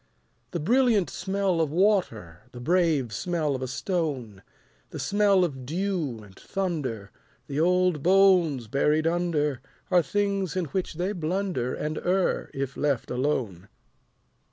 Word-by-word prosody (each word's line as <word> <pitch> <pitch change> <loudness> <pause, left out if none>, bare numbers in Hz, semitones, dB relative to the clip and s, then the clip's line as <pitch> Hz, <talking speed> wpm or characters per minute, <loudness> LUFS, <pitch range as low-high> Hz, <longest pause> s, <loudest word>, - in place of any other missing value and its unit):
The 170 - -3
brilliant 230 - +2
smell 190 -2 0
of 160 - +1
water, 155 - 0
The 120 - -8
brave 155 -5 +1
smell 160 - -1
of 130 - -4
a 130 - -2
stone, 135 - -3 0.5
The - - -8
smell 200 -2 +3
of 135 -7 -3
dew 160 - -2
and 100 -2 -16
thunder, 135 - -3 0.3
The 140 +1 -3
old 180 -2 +2
bones 180 -7 +4
buried 150 +7 +1
under, 160 -5 0 0.3
Are 180 -1 +6
things 200 -1 -1
in 185 -2 0
which 175 +3 -3
they 180 +4 -1
blunder 175 -7 -2
And 155 +1 -3
err, 185 +1 0
if 135 0 -4
left 140 -5 -1
alone. 125 - -2
165 Hz, 135 wpm, -26 LUFS, 135-185 Hz, 0.5 s, Are